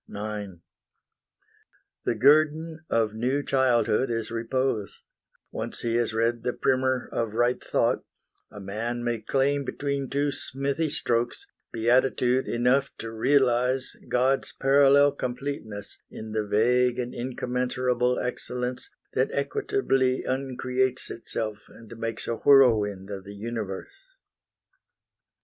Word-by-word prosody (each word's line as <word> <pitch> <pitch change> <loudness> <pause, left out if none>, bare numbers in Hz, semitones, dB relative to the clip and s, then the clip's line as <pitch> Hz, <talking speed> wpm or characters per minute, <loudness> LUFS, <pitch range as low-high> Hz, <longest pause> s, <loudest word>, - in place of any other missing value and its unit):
IX 105 -1 -5 1.5
The 120 - +1
guerdon 155 +5 +3
of 110 -2 +1
new 130 +6 0
childhood 130 -2 +2
is 115 -2 -2
repose: 115 -2 -2 0.5
Once - - -5
he 115 -1 -1
has 120 -2 +1
read 115 +1 0
the 125 +1 -1
primer 130 -1 +1
of 115 -2 -2
right 120 +2 +1
thought, - - +1 0.5
A 105 - -10
man 115 +5 -4
may 120 -1 -1
claim 140 +4 +1
between 140 0 -3
two 145 +1 0
smithy 140 +4 -2
strokes 120 -3 -1 0.3
Beatitude 125 +2 +2
enough 125 +3 +2
to 115 - -6
realize 130 +1 +2
God's 130 +2 +1
parallel 140 +1 +5
completeness 125 -6 -5
in 110 0 -8
the 110 -1 -1
vague 125 +4 +3
And 125 -1 -3
incommensurable 125 0 -1
excellence 125 - -3 0.2
That - - +1
equitably 395 - 0
uncreates 130 -1 -1
itself 110 -2 -4
And 115 0 -13
makes 115 -1 -4
a 115 - -1
whirlwind 105 -8 +4
of 95 -1 -6
the 100 +1 -10
Universe. 105 - -5
125 Hz, 115 wpm, -26 LUFS, 115-135 Hz, 1.5 s, parallel